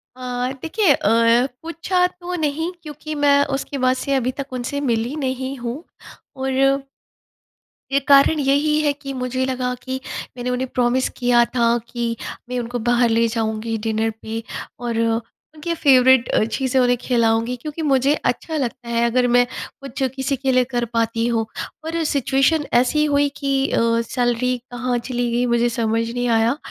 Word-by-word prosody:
अ, 250 0 -3
देखिए 335 -1 +3
अ, 230 +3 +3
पूछा 335 +3 0
तो 360 0 -8
नहीं 320 +1 -1
क्योंकि 305 0 -7
मैं 285 -1 +4
उसके 280 +1 -4
बाद 255 -1 +2
से 275 +1 -2
अभी 255 -1 0
तक 275 -1 -5
उनसे 255 +3 -3
मिली 240 0 -1
नहीं 265 -2 -3
हूँ। 245 +5 -5 0.5
और 270 +1 +1 1.1
ये 280 - +3
कारण 280 +2 +6
यही 290 +2 +2
है 295 -1 +2
कि 275 -1 -7
मुझे 255 0 -2
लगा 255 -1 -1
कि 260 0 -4 0.4
मैंने 245 +1 -3
उन्हें 250 +1 -1
प्रॉमिस 250 +1 +2
किया 245 -1 +4
था 235 0 +3
कि 235 -1 -2 0.3
मैं 250 - -2
उनको 240 0 -4
बाहर 240 +1 +2
ले 230 +1 +3
जाऊँगी 225 0 -2
डिनर 220 0 +1
पे 225 +1 -5 0.4
और 235 -2 -2 0.6
उनके 335 +3 -3
फ़ेवरेट 260 -5 +5
अ, - - +2
चीज़ें 260 +4 0
उन्हें 245 0 +3
खिलाऊँगी 230 0 +1
क्योंकि 305 +1 -5
मुझे 275 -1 +3
अच्छा 320 -1 -1
लगता 245 -3 -4
है 235 0 +1
अगर 245 +1 +2
मैं 245 0 +4 0.4
कुछ 275 0 -5
किसी 265 +1 -1
के 265 0 -1
लिए 255 0 +4
कर 240 -1 0
पाती 230 0 0
हूँ। 230 -2 0 0.4
पर 325 +1 -2
सिचुएशन 280 +1 +1
ऐसी 255 +5 +3
हुई 285 -1 +2
कि 275 -1 0
अ, - - +2 0.2
सैलरी 245 +1 0
कहाँ 245 0 -1
चली 245 0 -2
गई 240 +1 +1
मुझे 235 0 +2
समझ 230 -1 0
नहीं 245 +1 -2
आया, 230 +4 +2
255 Hz, 165 wpm, -21 LUFS, 235-280 Hz, 1.1 s, कारण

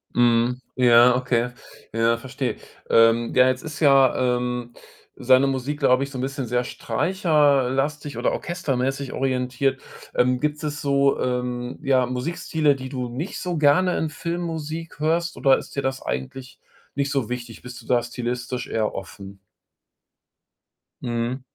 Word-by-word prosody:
Mhm, 120 +1 +3 0.2
ja, 125 0 +6
okay. 125 -1 0 0.4
Ja, 115 +1 +2
verstehe. 130 +1 -4 0.3
Ähm, 115 +1 +4
ja, 125 0 +5
jetzt 130 0 -1
ist 155 -1 -7
ja, 135 -4 +5 0.2
ähm, 125 -1 -4 0.4
seine 130 +2 +4
Musik, 135 +2 -2
glaube 130 -1 +3
ich, 140 - -5
so 130 - -6
'n - - -3
bisschen 135 -1 -3
sehr 125 +1 0
streicher 150 -7 +1
äh, - - -2
lastig 145 +2 -2
oder - - +1
orchestermäßig 135 -6 -2
orientiert. 130 +1 -1 0.4
Ähm, 125 0 +2
gibt 150 0 -1
es 150 -1 -3
so, 140 -1 +2
ähm, 125 0 -3
ja, 130 -2 +3
Musikstile, 145 +2 0
die 130 -1 -7
du 125 -2 -4
nicht 150 +11 -5
so 180 -3 -3
gerne 175 +5 +3
in 160 - -1
Filmmusik 165 -1 -5
hörst, 165 +2 0
oder 135 -1 +4
ist - - -9
dir 140 - 0
das 130 0 -2
eigentlich 125 - -6 0.4
nicht 140 -1 -1
so 135 -6 -1
wichtig? 120 -2 -6
Bist 125 0 -10
du - - -18
da 120 -1 +3
stilistisch 120 0 -4
eher 110 -1 -1
offen? 95 0 -9 1.6
Mhm. 120 +2 -2
130 Hz, 155 wpm, -23 LUFS, 125-145 Hz, 1.6 s, ja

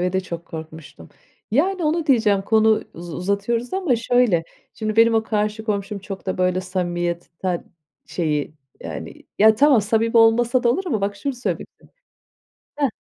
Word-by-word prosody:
ve 180 +1 0
de 190 - +1
çok 170 -2 -7
korkmuştum. 160 - -10 0.4
Yani 350 - +1
onu 320 +1 0
diyeceğim, 215 -7 +3
konu 220 +1 +3
uz 170 -1 -8
uzatıyoruz 200 +6 -1
ama 360 -11 +1
şöyle: 230 -7 +2 0.3
Şimdi 215 -1 -3
benim 230 0 +5
o 225 - +3
karşı 215 0 -2
komşum 200 -1 -2
çok 195 0 -8
da 185 - -2
böyle 185 0 +1
samimiyetten, 175 -1 -3 0.4
şeyi 150 -3 -2 0.3
yani - - -8 0.2
ya 220 +1 +7
tamam, 275 -1 +5
samimi 225 +2 +1
olmasa 235 +3 +4
da 240 - +3
olur 335 +10 0
ama 225 - -1
bak 200 +1 -2
şunu 275 +7 -3
söylemişti. 245 0 -5 0.9
Hıh. 285 -2 +2
215 Hz, 155 wpm, -22 LUFS, 185-235 Hz, 0.9 s, ya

